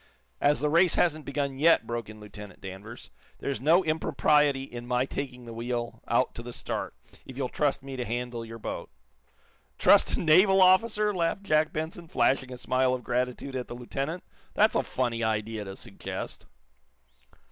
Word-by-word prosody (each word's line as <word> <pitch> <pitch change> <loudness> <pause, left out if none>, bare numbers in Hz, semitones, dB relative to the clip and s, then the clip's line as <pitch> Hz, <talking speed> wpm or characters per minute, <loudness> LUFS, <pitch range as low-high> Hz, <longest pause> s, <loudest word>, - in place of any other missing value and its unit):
"As 145 +1 +3
the 150 - +1
race 170 +2 +4
hasn't 155 -3 +1
begun 140 -1 -2
yet," 165 -5 +5
broke 115 -2 -4
in 110 0 -11
Lieutenant 105 -2 -11
Danvers, 100 +5 -9 0.3
"there - - -3
is 125 - -4
no 165 +7 +5
impropriety 150 -3 +2
in 120 -2 -8
my 125 +1 +1
taking 130 -3 -6
the 115 - -8
wheel 120 0 -4
out 120 +2 +2
to - - -7
the 120 +1 -8
start, - - -4 0.3
if 130 - -11
you'll 130 -2 -2
trust 145 -2 0
me 135 -1 -7
to 125 - -2
handle 120 0 -4
your 115 0 -9
boat." 115 - -6 0.9
"Trust - - +5
a - - -3
naval 190 +4 +5
officer?" 210 +3 +4
laughed 175 +2 -1
Jack 155 -4 +2
Benson, 160 +2 -5
flashing 130 -1 +1
a 125 - -6
smile 130 +1 +1
of 125 - -8
gratitude 125 +2 -2
at 125 -1 -3
the 120 - -7
lieutenant. 135 +7 -4 0.3
"That's - - +4
a - - +3
funny 120 -2 -2
idea 110 -1 -2
to 95 0 -7
suggest." - - -7
130 Hz, 180 wpm, -28 LUFS, 120-155 Hz, 0.9 s, yet